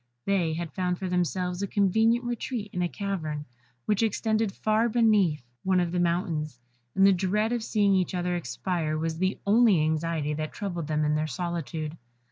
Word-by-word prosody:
They 180 Hz, -5 st, +1 dB
had 165 Hz, 0 st, -4 dB
found 180 Hz, -1 st, -1 dB
for 190 Hz, -, -4 dB
themselves 180 Hz, 0 st, -1 dB
a 200 Hz, -, -1 dB
convenient 220 Hz, +5 st, +2 dB
retreat 240 Hz, -3 st, -3 dB
in 180 Hz, -, -1 dB
a 175 Hz, -, 0 dB
cavern, 160 Hz, -8 st, -3 dB, 0.4 s
which 210 Hz, 0 st, +1 dB
extended 220 Hz, -1 st, +1 dB
far 220 Hz, +4 st, +1 dB
beneath 210 Hz, -, +3 dB, 0.2 s
one 185 Hz, -1 st, +3 dB
of 175 Hz, -1 st, 0 dB
the 180 Hz, -, 0 dB
mountains, 170 Hz, -, -1 dB, 0.4 s
and 195 Hz, -, +5 dB
the 195 Hz, -, +7 dB
dread 200 Hz, +5 st, 0 dB
of 240 Hz, -1 st, 0 dB
seeing 205 Hz, -2 st, +2 dB
each 185 Hz, 0 st, +1 dB
other 180 Hz, 0 st, -1 dB
expire 160 Hz, +2 st, -2 dB
was 160 Hz, +1 st, -2 dB
the 185 Hz, +2 st, 0 dB
only 210 Hz, -3 st, +5 dB
anxiety 155 Hz, -1 st, 0 dB
that 155 Hz, 0 st, -4 dB
troubled 175 Hz, -6 st, -4 dB
them 155 Hz, -1 st, 0 dB
in 150 Hz, -, +2 dB
their 155 Hz, +1 st, 0 dB
solitude. 160 Hz, 0 st, -4 dB
180 Hz, 180 wpm, -27 LUFS, 160-205 Hz, 0.4 s, the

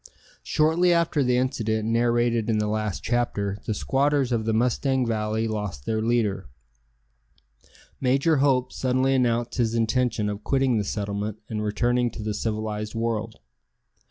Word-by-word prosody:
Shortly 160 Hz, +3 st, +2 dB
after 170 Hz, -3 st, +2 dB
the 125 Hz, -1 st, +2 dB
incident 110 Hz, -4 st, -1 dB
narrated 120 Hz, 0 st, +1 dB
in 110 Hz, -, +2 dB
the 105 Hz, -, +1 dB
last 105 Hz, -2 st, -2 dB
chapter 105 Hz, -4 st, -1 dB
the 110 Hz, -, 0 dB
squatters 135 Hz, +2 st, +1 dB
of 115 Hz, -2 st, 0 dB
the 110 Hz, -, +1 dB
Mustang 125 Hz, +3 st, +1 dB
Valley 110 Hz, 0 st, -1 dB
lost 105 Hz, -11 st, -4 dB
their 110 Hz, -1 st, -1 dB
leader. 110 Hz, -, 0 dB, 1.5 s
Major 135 Hz, +5 st, +2 dB
Hope 135 Hz, -2 st, +2 dB
suddenly 130 Hz, +1 st, +1 dB
announced 120 Hz, -2 st, 0 dB
his 115 Hz, -1 st, +1 dB
intention 115 Hz, -1 st, +1 dB
of 105 Hz, 0 st, -4 dB
quitting 135 Hz, -3 st, +2 dB
the -, -, 0 dB
settlement 100 Hz, +1 st, -3 dB
and 110 Hz, -1 st, -3 dB
returning 120 Hz, +3 st, +1 dB
to 110 Hz, -, -8 dB
the 105 Hz, 0 st, -2 dB
civilized 105 Hz, 0 st, -3 dB
world. 115 Hz, -, -3 dB
115 Hz, 145 wpm, -25 LUFS, 105-125 Hz, 1.5 s, Shortly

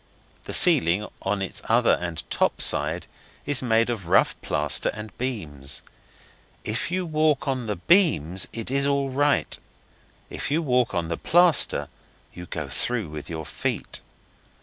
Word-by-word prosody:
The -, -, -6 dB
ceiling, 85 Hz, +6 st, +5 dB, 0.2 s
on 95 Hz, 0 st, -1 dB
its 95 Hz, -, -4 dB
other -, -, +4 dB
and 85 Hz, -2 st, -5 dB
top -, -, +1 dB
side, -, -, +3 dB, 0.4 s
is 145 Hz, -2 st, +1 dB
made 115 Hz, -2 st, +2 dB
of 100 Hz, -8 st, -5 dB
rough -, -, +3 dB
plaster 75 Hz, 0 st, +1 dB
and 105 Hz, 0 st, -9 dB
beams. 75 Hz, -, -4 dB, 0.8 s
If 110 Hz, +4 st, -3 dB
you 185 Hz, +1 st, -2 dB
walk 155 Hz, -3 st, +1 dB
on 130 Hz, -4 st, -2 dB
the 105 Hz, -, -2 dB
beams 95 Hz, -, +2 dB
it 115 Hz, +2 st, -6 dB
is 140 Hz, +1 st, +1 dB
all 140 Hz, -1 st, 0 dB
right 145 Hz, +2 st, +1 dB, 0.7 s
if -, -, -5 dB
you 160 Hz, +4 st, 0 dB
walk 125 Hz, -4 st, +1 dB
on 85 Hz, -2 st, -2 dB
the 85 Hz, -, -2 dB
plaster 175 Hz, -2 st, +3 dB, 0.5 s
you 90 Hz, 0 st, -9 dB
go 75 Hz, -3 st, -5 dB
through 110 Hz, -, -2 dB
with 75 Hz, -1 st, -8 dB
your 80 Hz, -2 st, -5 dB
feet. -, -, -3 dB
115 Hz, 150 wpm, -24 LUFS, 85-140 Hz, 0.8 s, ceiling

